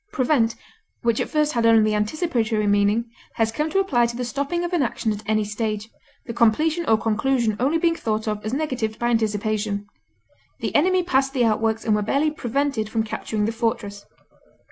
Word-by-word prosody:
Prevent, 245 Hz, -, +1 dB, 0.5 s
which 235 Hz, -1 st, +1 dB
at -, -, -2 dB
first 300 Hz, -1 st, +1 dB
had 235 Hz, -2 st, 0 dB
only 225 Hz, -2 st, +5 dB
the -, -, 0 dB
anticipatory 220 Hz, -, 0 dB
meaning, 205 Hz, +3 st, +2 dB, 0.3 s
has 225 Hz, -1 st, +1 dB
come 300 Hz, +7 st, -1 dB
to 390 Hz, -, -1 dB
apply 260 Hz, -12 st, +2 dB
to 235 Hz, -, -6 dB
the 250 Hz, +1 st, -3 dB
stopping 280 Hz, +7 st, -2 dB
of 350 Hz, +1 st, -3 dB
an 345 Hz, -, +2 dB
action 235 Hz, -3 st, -1 dB
at 210 Hz, -, -7 dB
any 215 Hz, 0 st, +2 dB
stage, 215 Hz, 0 st, -3 dB, 0.4 s
the 230 Hz, -, -5 dB
completion 305 Hz, +9 st, +2 dB
or 220 Hz, -, +5 dB
conclusion 225 Hz, +1 st, 0 dB
only 280 Hz, +7 st, +2 dB
being 330 Hz, 0 st, +2 dB
thought 220 Hz, -6 st, -2 dB
of 210 Hz, -1 st, -2 dB
as 215 Hz, -, -3 dB
negatived 255 Hz, -6 st, -2 dB
by 240 Hz, -, 0 dB
anticipation; 215 Hz, -2 st, -1 dB, 0.7 s
the -, -, -3 dB
enemy 365 Hz, +4 st, +3 dB
passed 270 Hz, -5 st, +1 dB
the 250 Hz, -4 st, +2 dB
outworks 225 Hz, 0 st, 0 dB
and 220 Hz, -, +2 dB
were 210 Hz, -, +2 dB
barely 280 Hz, +8 st, +1 dB
prevented 270 Hz, -4 st, -1 dB
from 220 Hz, 0 st, 0 dB
capturing 215 Hz, -1 st, -3 dB
the 220 Hz, -, 0 dB
fortress. 225 Hz, -3 st, -3 dB
230 Hz, 190 wpm, -23 LUFS, 215-275 Hz, 0.7 s, only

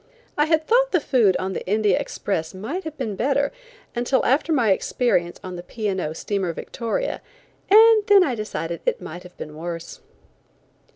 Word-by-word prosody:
I 295 Hz, -, +3 dB
had 315 Hz, 0 st, +1 dB
thought -, -, +3 dB
the 355 Hz, -, +4 dB
food 235 Hz, -10 st, +3 dB
on 190 Hz, +1 st, -3 dB
the -, -, -4 dB
India 210 Hz, -1 st, +2 dB
Express 165 Hz, -4 st, -3 dB
might 275 Hz, -, -5 dB
have 310 Hz, -1 st, -6 dB
been 225 Hz, -7 st, -3 dB
better 280 Hz, +6 st, +1 dB, 0.4 s
until 245 Hz, +2 st, +1 dB
after 290 Hz, +5 st, +2 dB
my 240 Hz, -9 st, +3 dB
experience 190 Hz, -4 st, 0 dB
on 185 Hz, -1 st, -6 dB
the -, -, -6 dB
P. 215 Hz, +4 st, -5 dB
& 190 Hz, -1 st, -1 dB
O. 155 Hz, -, -3 dB
steamer 190 Hz, 0 st, -2 dB
Victoria, 235 Hz, -, -3 dB, 0.5 s
and 440 Hz, +1 st, +7 dB
then 400 Hz, -2 st, +7 dB
I 275 Hz, -, 0 dB
decided 170 Hz, -7 st, -4 dB
it -, -, +1 dB
might 175 Hz, +3 st, -8 dB
have 180 Hz, 0 st, -15 dB
been 150 Hz, 0 st, -8 dB
worse. 170 Hz, +1 st, -6 dB
220 Hz, 180 wpm, -23 LUFS, 180-300 Hz, 0.5 s, and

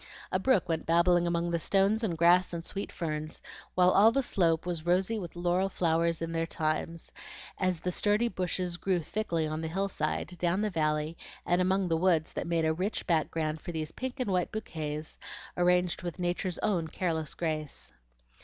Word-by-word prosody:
A -, -, +1 dB
brook 215 Hz, -9 st, +2 dB
went 165 Hz, -2 st, -2 dB
babbling 170 Hz, +1 st, +4 dB
among 170 Hz, 0 st, 0 dB
the 170 Hz, -, +1 dB
stones 200 Hz, +6 st, +2 dB
and 175 Hz, -7 st, -1 dB
grass 175 Hz, +2 st, +4 dB
and 170 Hz, 0 st, -4 dB
sweet 200 Hz, -, -4 dB
ferns, 155 Hz, -1 st, -4 dB, 0.4 s
while 180 Hz, 0 st, +5 dB
all 210 Hz, +4 st, +6 dB
the 270 Hz, +3 st, +1 dB
slope 170 Hz, -8 st, +1 dB
was 175 Hz, -3 st, -3 dB
rosy 185 Hz, +6 st, +1 dB
with 175 Hz, -4 st, -7 dB
laurel 175 Hz, +2 st, +1 dB
flowers 165 Hz, -2 st, +1 dB
in 165 Hz, -, -3 dB
their 165 Hz, 0 st, -1 dB
times, 160 Hz, +1 st, -2 dB, 0.5 s
as 185 Hz, -3 st, 0 dB
the 180 Hz, -, -1 dB
sturdy 210 Hz, +5 st, +2 dB
bushes 180 Hz, -3 st, -2 dB
grew 185 Hz, -1 st, 0 dB
thickly 170 Hz, -2 st, -1 dB
on 155 Hz, +1 st, -3 dB
the 160 Hz, -, -2 dB
hill 195 Hz, +4 st, -1 dB
side, 185 Hz, -, -2 dB
down 180 Hz, +3 st, +1 dB
the 210 Hz, -, 0 dB
valley, 155 Hz, -1 st, 0 dB, 0.3 s
and 175 Hz, +1 st, +2 dB
among 190 Hz, +1 st, +2 dB
the 165 Hz, -1 st, +1 dB
woods 165 Hz, -2 st, +2 dB
that -, -, -3 dB
made 165 Hz, -1 st, +1 dB
a 160 Hz, -, +2 dB
rich 185 Hz, +6 st, -2 dB
background 160 Hz, -2 st, 0 dB
for 175 Hz, -, -6 dB
these 155 Hz, -2 st, -3 dB
pink 260 Hz, +1 st, -5 dB
and 250 Hz, -6 st, -1 dB
white 180 Hz, -2 st, +1 dB
bouquets 155 Hz, -7 st, -5 dB, 0.4 s
arranged 180 Hz, 0 st, +2 dB
with 175 Hz, -3 st, -5 dB
Nature's 180 Hz, 0 st, -1 dB
own 180 Hz, -6 st, +1 dB
careless 160 Hz, -2 st, -2 dB
grace. 155 Hz, -3 st, -4 dB
175 Hz, 190 wpm, -30 LUFS, 165-185 Hz, 0.5 s, all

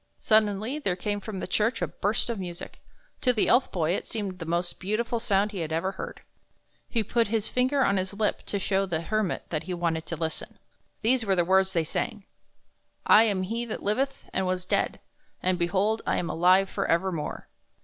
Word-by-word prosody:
Suddenly 215 Hz, +5 st, +2 dB
there 195 Hz, -11 st, 0 dB
came 205 Hz, +3 st, -2 dB
from 200 Hz, -1 st, -6 dB
the -, -, -3 dB
church 215 Hz, +6 st, +1 dB
a -, -, +1 dB
burst 220 Hz, +4 st, -1 dB
of 225 Hz, -, -4 dB
music. 175 Hz, -2 st, -7 dB, 0.4 s
To 255 Hz, -, +4 dB
the 225 Hz, -4 st, +1 dB
Elf 250 Hz, +2 st, +4 dB
Boy 165 Hz, -3 st, 0 dB
it 185 Hz, -, -2 dB
seemed 200 Hz, -5 st, -4 dB
the 165 Hz, -, -6 dB
most 175 Hz, +1 st, -1 dB
beautiful 225 Hz, +4 st, -1 dB
sound 205 Hz, -2 st, +1 dB
he 200 Hz, -, -5 dB
had 160 Hz, -2 st, -3 dB
ever 165 Hz, +4 st, 0 dB
heard. -, -, -7 dB, 0.7 s
He 230 Hz, -3 st, 0 dB
put 230 Hz, +2 st, +1 dB
his 220 Hz, 0 st, -1 dB
finger 260 Hz, +2 st, +2 dB
on 200 Hz, -, +2 dB
his 190 Hz, +1 st, -2 dB
lip 210 Hz, 0 st, 0 dB
to 205 Hz, -, -1 dB
show 195 Hz, 0 st, 0 dB
the 165 Hz, -3 st, -1 dB
Hermit 215 Hz, +2 st, -1 dB
that 155 Hz, -1 st, -3 dB
he 180 Hz, 0 st, -3 dB
wanted 165 Hz, -2 st, -1 dB
to 165 Hz, -, -3 dB
listen. 160 Hz, 0 st, -4 dB, 0.5 s
These 245 Hz, +2 st, +3 dB
were 195 Hz, -3 st, +2 dB
the 175 Hz, -2 st, +2 dB
words 190 Hz, +1 st, +3 dB
they 165 Hz, -3 st, +2 dB
sang: 200 Hz, +5 st, -2 dB, 0.8 s
"7 225 Hz, +1 st, +7 dB
am 195 Hz, -3 st, 0 dB
He 230 Hz, +5 st, -2 dB
that 220 Hz, -, -5 dB
liveth, 265 Hz, +7 st, -1 dB
and 190 Hz, 0 st, 0 dB
was 185 Hz, 0 st, -1 dB
dead; -, -, 0 dB, 0.4 s
and, 185 Hz, 0 st, +2 dB
behold, 195 Hz, +6 st, +1 dB
I -, -, +2 dB
am 170 Hz, -, -1 dB
alive 185 Hz, +3 st, +4 dB
for -, -, -2 dB
evermore 170 Hz, -2 st, -1 dB
195 Hz, 205 wpm, -27 LUFS, 180-220 Hz, 0.8 s, 7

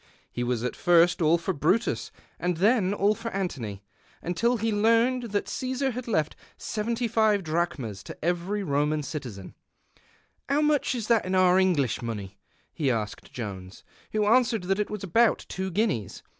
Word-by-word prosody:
He 120 Hz, -, -3 dB
was 120 Hz, -1 st, -1 dB
at 125 Hz, -, -2 dB
first 175 Hz, +1 st, +4 dB
all 160 Hz, +1 st, +4 dB
for 170 Hz, +3 st, -2 dB
Brutus 185 Hz, +10 st, 0 dB, 0.3 s
and 180 Hz, -1 st, -1 dB
then 200 Hz, 0 st, +3 dB
all 205 Hz, +1 st, +2 dB
for 230 Hz, +1 st, -5 dB
Antony, 130 Hz, -, -4 dB, 0.4 s
until 230 Hz, +9 st, +1 dB
he 225 Hz, +1 st, -1 dB
learnt 230 Hz, +3 st, +2 dB
that 205 Hz, -, 0 dB
Casar 260 Hz, +1 st, -2 dB
had 250 Hz, +1 st, -6 dB
left 155 Hz, -9 st, 0 dB, 0.2 s
75 220 Hz, -2 st, 0 dB
drachmas 155 Hz, -, -2 dB
to -, -, -8 dB
every 180 Hz, +4 st, -1 dB
Roman 150 Hz, -1 st, 0 dB
citizen. 125 Hz, -, -7 dB, 0.5 s
'* -, -, -30 dB
How 285 Hz, +2 st, +2 dB
much 300 Hz, -3 st, +2 dB
is 225 Hz, -3 st, -4 dB
that 230 Hz, -2 st, +3 dB
in 185 Hz, +1 st, -1 dB
our 185 Hz, 0 st, +5 dB
English 165 Hz, -, +1 dB
money? 100 Hz, -4 st, -6 dB, 0.2 s
' -, -, -39 dB
he 150 Hz, -5 st, 0 dB
asked 110 Hz, -4 st, -3 dB
Joins, 100 Hz, -4 st, -7 dB, 0.3 s
who 215 Hz, -1 st, +1 dB
answered 230 Hz, -2 st, +3 dB
that 195 Hz, +2 st, 0 dB
it 210 Hz, -, -1 dB
was 210 Hz, -2 st, -5 dB
al)out 225 Hz, +6 st, +3 dB
two 190 Hz, +1 st, -3 dB
guineas. 175 Hz, -, -1 dB
185 Hz, 170 wpm, -27 LUFS, 145-225 Hz, 0.5 s, our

